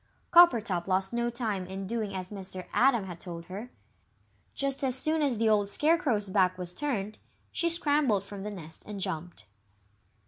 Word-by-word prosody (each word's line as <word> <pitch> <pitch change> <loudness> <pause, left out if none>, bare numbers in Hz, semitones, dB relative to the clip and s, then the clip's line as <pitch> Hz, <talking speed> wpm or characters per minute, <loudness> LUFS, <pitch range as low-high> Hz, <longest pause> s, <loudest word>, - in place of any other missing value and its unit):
Coppertop 225 - +5
lost 190 +2 0
no 235 0 0
time 220 -6 -3
in 190 +1 -6
doing 215 -1 -3
as 185 0 -6
Mr. 190 -2 -7
Atom 245 -4 +3
had 175 -3 -8
told 170 -2 -8
her. 205 +7 -7 0.9
Just 275 0 +3
as 255 -2 +3
soon 310 +4 +1
as 275 -6 +1
the 225 +1 +1
old 205 -2 +3
Scarecrow's 285 - +1
back 185 -2 +2
was 180 -1 -6
turned, 215 -6 -3 0.3
she 340 - 0
scrambled 290 - +2
from 200 0 -8
the 210 - -4
nest 165 -6 -10
and 210 -1 -6
jumped. 170 - -5
210 Hz, 170 wpm, -29 LUFS, 185-255 Hz, 0.9 s, Coppertop